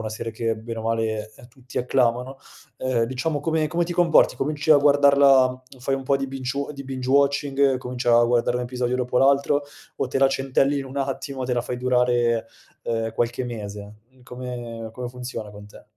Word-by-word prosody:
una 110 Hz, -, -4 dB
serie 115 Hz, +1 st, -5 dB
che, 115 Hz, 0 st, -2 dB
bene 115 Hz, +1 st, -7 dB
o -, -, -7 dB
male, 110 Hz, -1 st, -2 dB, 0.2 s
tutti 130 Hz, +1 st, -8 dB
acclamano, 125 Hz, +1 st, 0 dB, 0.4 s
ehm, 130 Hz, -3 st, 0 dB
diciamo, 130 Hz, +5 st, -2 dB
come 160 Hz, +1 st, 0 dB
come 170 Hz, +2 st, 0 dB
ti 175 Hz, +1 st, -5 dB
comporti? 170 Hz, -2 st, +4 dB
Cominci 150 Hz, +2 st, -2 dB
a 155 Hz, -, +9 dB
guardarla 140 Hz, -3 st, +5 dB, 0.2 s
fai 135 Hz, +2 st, -1 dB
un 135 Hz, -, -4 dB
po' 135 Hz, +1 st, +1 dB
di 135 Hz, -, -2 dB
binge-wa 135 Hz, +2 st, -4 dB
di 140 Hz, -1 st, -9 dB
binge-watching, 135 Hz, +1 st, +1 dB
cominci 125 Hz, -1 st, -6 dB
a 120 Hz, 0 st, +6 dB
guardare 120 Hz, 0 st, +1 dB
un 125 Hz, -, -3 dB
episodio 125 Hz, 0 st, -2 dB
dopo 125 Hz, -1 st, -2 dB
l'altro, 140 Hz, +2 st, +3 dB, 0.3 s
o -, -, -1 dB
te 135 Hz, -, -1 dB
la 135 Hz, -, +5 dB
centellini 135 Hz, +1 st, +1 dB
un 135 Hz, +1 st, -6 dB
attimo, 135 Hz, -1 st, -3 dB
te 125 Hz, -, 0 dB
la 120 Hz, -, 0 dB
fai 125 Hz, 0 st, -5 dB
durare, 120 Hz, -2 st, +1 dB, 0.3 s
ehm, 115 Hz, -1 st, -2 dB
qualche 120 Hz, +2 st, -1 dB
mese? 105 Hz, -3 st, -7 dB, 0.2 s
Uhm, 130 Hz, -1 st, -24 dB
come-come 125 Hz, -1 st, -7 dB
funziona 125 Hz, -4 st, -7 dB
con 105 Hz, 0 st, -12 dB
te? 105 Hz, -, -15 dB
125 Hz, 185 wpm, -23 LUFS, 120-135 Hz, 0.4 s, a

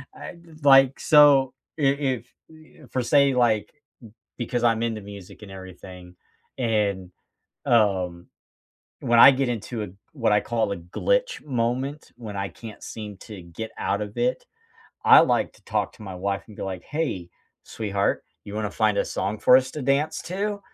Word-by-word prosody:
I -, -, -9 dB
just 155 Hz, -3 st, -15 dB
like 135 Hz, -1 st, +6 dB
so, 140 Hz, -3 st, +5 dB, 0.3 s
i -, -, -3 dB
if 135 Hz, -4 st, 0 dB, 0.3 s
i -, -, -16 dB
if 155 Hz, -4 st, -18 dB
for 130 Hz, -, -1 dB
say, 140 Hz, +2 st, +4 dB
like, 110 Hz, -4 st, +2 dB
mm 145 Hz, -, -38 dB, 0.6 s
because 120 Hz, 0 st, -2 dB
I'm 115 Hz, -1 st, +2 dB
into 115 Hz, -2 st, -2 dB
music 100 Hz, -1 st, -12 dB
and 105 Hz, -, -11 dB
everything, 90 Hz, -1 st, -11 dB, 0.4 s
and, 100 Hz, -6 st, -1 dB, 0.5 s
um, 95 Hz, -6 st, +1 dB, 0.7 s
when 120 Hz, 0 st, +2 dB
I 125 Hz, -, +10 dB
get 135 Hz, -1 st, 0 dB
into 115 Hz, -1 st, -4 dB
a 105 Hz, -, -5 dB, 0.2 s
what 120 Hz, -8 st, 0 dB
I 105 Hz, -, +4 dB
call 110 Hz, -3 st, -1 dB
a -, -, -3 dB
"glitch -, -, -1 dB
moment," 130 Hz, +3 st, -2 dB
when 110 Hz, -4 st, -8 dB
I 95 Hz, 0 st, -2 dB
can't 110 Hz, -3 st, -11 dB
seem 105 Hz, -2 st, -8 dB
to 105 Hz, -1 st, -10 dB
get 85 Hz, +7 st, -8 dB
out 100 Hz, -, -1 dB
of 105 Hz, 0 st, -7 dB
it, 255 Hz, -, 0 dB, 0.6 s
I -, -, +9 dB
like -, -, +1 dB
to -, -, -24 dB
talk -, -, -2 dB
to 110 Hz, -, -14 dB
my 95 Hz, -3 st, -7 dB
wife 100 Hz, +2 st, -3 dB
and 105 Hz, -, -14 dB
be -, -, -6 dB
like, 95 Hz, -2 st, -5 dB
"Hey, 135 Hz, -, -3 dB, 0.3 s
sweetheart, 100 Hz, -2 st, -2 dB, 0.2 s
you 100 Hz, -, -9 dB
wanna 105 Hz, -1 st, -2 dB
find 110 Hz, -2 st, +1 dB
a -, -, +2 dB
song 100 Hz, +3 st, -3 dB
for 125 Hz, -, +6 dB
us 130 Hz, 0 st, +1 dB
to 150 Hz, -, -6 dB
dance 140 Hz, +4 st, 0 dB
to?" 200 Hz, +3 st, -3 dB
115 Hz, 180 wpm, -24 LUFS, 100-135 Hz, 0.7 s, I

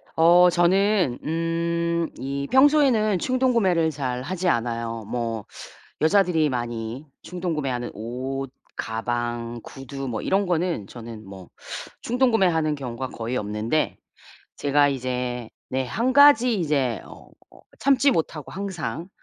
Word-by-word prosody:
어 175 Hz, +2 st, +6 dB
저는 180 Hz, -, +2 dB
음 165 Hz, +1 st, -1 dB, 0.4 s
이 140 Hz, +1 st, -3 dB
평소에는 260 Hz, -, +4 dB
충동구매를 230 Hz, -11 st, +2 dB
잘 130 Hz, -4 st, -3 dB
하지 185 Hz, +4 st, -3 dB
않아요. 115 Hz, -3 st, -2 dB
뭐 115 Hz, -3 st, -3 dB, 0.6 s
여자들이 165 Hz, -2 st, +3 dB
많이 120 Hz, +1 st, -4 dB, 0.2 s
충동구매하는 150 Hz, -9 st, -3 dB
옷, 130 Hz, +5 st, -5 dB, 0.2 s
가방, 120 Hz, +1 st, -3 dB
구두 135 Hz, 0 st, -7 dB
뭐 115 Hz, -3 st, -3 dB
이런 195 Hz, 0 st, +1 dB
거는 170 Hz, -, -1 dB
저는 115 Hz, -2 st, -9 dB
뭐 95 Hz, -2 st, -11 dB, 0.5 s
충동구매하는 195 Hz, -, +2 dB
경우가 130 Hz, -2 st, -5 dB
거의 120 Hz, +2 st, -4 dB
없는데 105 Hz, +8 st, -1 dB, 0.6 s
제가 145 Hz, 0 st, +3 dB
이제 125 Hz, -3 st, -3 dB, 0.2 s
네 130 Hz, 0 st, -1 dB
1 240 Hz, -, 0 dB
가지 265 Hz, -4 st, +7 dB
이제 140 Hz, -, 0 dB
어 -, -, -13 dB, 0.5 s
참지 275 Hz, 0 st, +4 dB
못하고 155 Hz, -, -2 dB
항상 175 Hz, -, -5 dB
145 Hz, 240 characters per minute, -24 LUFS, 120-185 Hz, 0.6 s, 가지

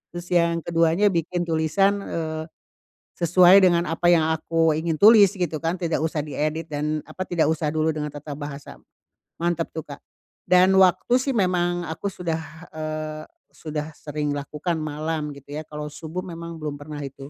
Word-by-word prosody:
Terus 175 Hz, 0 st, -6 dB
yang 170 Hz, -1 st, +2 dB
keduanya, 170 Hz, +4 st, +2 dB
bikin 175 Hz, +1 st, -1 dB
tulisan, 170 Hz, +5 st, +1 dB
eee, 160 Hz, -3 st, -4 dB, 0.7 s
sesuai 180 Hz, +3 st, +6 dB
dengan 175 Hz, -1 st, +3 dB
apa 175 Hz, +2 st, +1 dB
yang 160 Hz, -2 st, +4 dB
aku 165 Hz, 0 st, +1 dB
ingin 160 Hz, -1 st, -2 dB
tulis, 205 Hz, -2 st, +8 dB
gitu 175 Hz, -5 st, -2 dB
kan, 165 Hz, +3 st, 0 dB
tidak 165 Hz, -3 st, -1 dB
usah 160 Hz, -1 st, -1 dB
diedit 155 Hz, +2 st, -2 dB
dan, 150 Hz, 0 st, -2 dB
apa, 185 Hz, -, -5 dB
tidak 170 Hz, -3 st, +1 dB
usah 155 Hz, -1 st, -1 dB
dulu 155 Hz, 0 st, +1 dB
dengan 150 Hz, -1 st, -3 dB
tata 145 Hz, 0 st, -7 dB
bahasa. 145 Hz, -1 st, -8 dB, 0.7 s
Mantap 170 Hz, -1 st, 0 dB
tuh, 160 Hz, -, -4 dB
Kak! 140 Hz, -, -9 dB, 0.5 s
Dan, 185 Hz, +1 st, +5 dB
waktu 190 Hz, +6 st, +4 dB
sih, 265 Hz, +1 st, -1 dB
memang 175 Hz, -3 st, +1 dB
aku 160 Hz, +5 st, -4 dB
sudah, 170 Hz, -4 st, -3 dB, 0.3 s
eee, 155 Hz, 0 st, -5 dB, 0.3 s
sudah 155 Hz, 0 st, -5 dB
sering 150 Hz, -1 st, -3 dB
lakukan 150 Hz, +4 st, -3 dB
malam, 155 Hz, 0 st, -3 dB
gitu 140 Hz, +1 st, -12 dB
ya. 155 Hz, -, -3 dB
Kalau 150 Hz, -1 st, -6 dB
subuh 165 Hz, +3 st, -6 dB
memang 170 Hz, -1 st, -7 dB
belum 150 Hz, -1 st, -3 dB
pernah, 145 Hz, 0 st, -8 dB
itu. 140 Hz, 0 st, -9 dB
160 Hz, 165 wpm, -24 LUFS, 155-175 Hz, 0.7 s, tulis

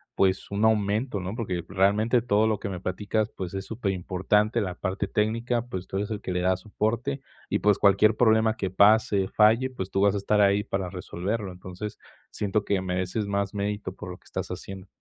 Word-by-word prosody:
pues, 95 Hz, -1 st, +1 dB
un 105 Hz, +2 st, +1 dB
aumento, 105 Hz, +1 st, +1 dB
no? 95 Hz, +4 st, -5 dB
Porque 95 Hz, -8 st, -3 dB
realmente 105 Hz, +5 st, +3 dB
todo 110 Hz, -2 st, +3 dB
lo 110 Hz, -2 st, 0 dB
que -, -, -4 dB
me 90 Hz, -2 st, -5 dB
platicas, 105 Hz, +4 st, -1 dB
pues, 95 Hz, -1 st, -5 dB
es 95 Hz, 0 st, -4 dB
superimportante 105 Hz, 0 st, 0 dB
la 90 Hz, -3 st, -2 dB
parte 95 Hz, +1 st, -2 dB
técnica, 115 Hz, +4 st, 0 dB
pues, 95 Hz, -5 st, -6 dB
tú 95 Hz, -, -4 dB
eres 100 Hz, +2 st, -2 dB
el 105 Hz, -1 st, -4 dB
que 95 Hz, -, -4 dB
le 90 Hz, 0 st, 0 dB
da 95 Hz, 0 st, +2 dB
soporte, 115 Hz, +7 st, -2 dB, 0.3 s
y, -, -, +1 dB
pues, 105 Hz, -1 st, +3 dB
cualquier 105 Hz, +2 st, +4 dB
problema 110 Hz, -1 st, +3 dB
que 95 Hz, -, -2 dB
pase, 100 Hz, -1 st, +4 dB
falle, 115 Hz, +5 st, +4 dB
pues, 95 Hz, -7 st, -6 dB
tú 95 Hz, -, +1 dB
vas 100 Hz, 0 st, +4 dB
a -, -, +1 dB
estar 105 Hz, +1 st, +2 dB
ahí 100 Hz, +1 st, +4 dB
para 95 Hz, -2 st, -3 dB
resolverlo. 95 Hz, +2 st, -4 dB
Entonces 90 Hz, +3 st, -8 dB, 0.3 s
siento 105 Hz, 0 st, -1 dB
que 100 Hz, -2 st, +1 dB
mereces 95 Hz, +3 st, -2 dB
más 100 Hz, -1 st, -1 dB
mérito 100 Hz, -2 st, -3 dB
por 90 Hz, -, -8 dB
lo 90 Hz, -, -8 dB
que -, -, -32 dB
estás -, -, -4 dB
haciendo. 95 Hz, -1 st, -7 dB
100 Hz, 205 wpm, -26 LUFS, 95-110 Hz, 0.3 s, cualquier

